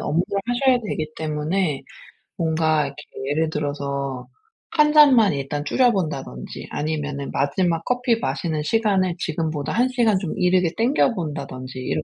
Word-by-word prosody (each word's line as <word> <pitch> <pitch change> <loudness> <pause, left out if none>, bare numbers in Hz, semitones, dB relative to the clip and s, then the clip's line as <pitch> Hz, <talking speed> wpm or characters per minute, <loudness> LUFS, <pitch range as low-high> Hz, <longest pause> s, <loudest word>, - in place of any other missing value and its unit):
업무를 165 +4 0 0.2
하셔야 250 +1 +3
되기 155 -3 -3
때문에 155 0 -1 0.6
뭔가 160 -2 +1
이렇게 140 +2 -9 0.3
예를 155 +2 +1
들어서 140 -3 -3 0.4
1 300 -1 +4
잔만 260 -9 +7
일단 140 +1 -3
줄여 250 - +3
본다든지 140 - -4
아니면은 145 -2 -3
마지막 165 +4 0
커피 245 -2 +1
마시는 160 -9 -2
시간을 190 -2 +1
지금보다 155 -3 -2
1 245 +2 +2
시간 230 -6 +2
좀 185 -5 -4
이르게 180 -1 +3
땡겨 245 +2 +3
본다든지 135 -5 -5
이렇게 150 +4 -2
160 Hz, 325 characters per minute, -22 LUFS, 145-205 Hz, 0.6 s, 잔만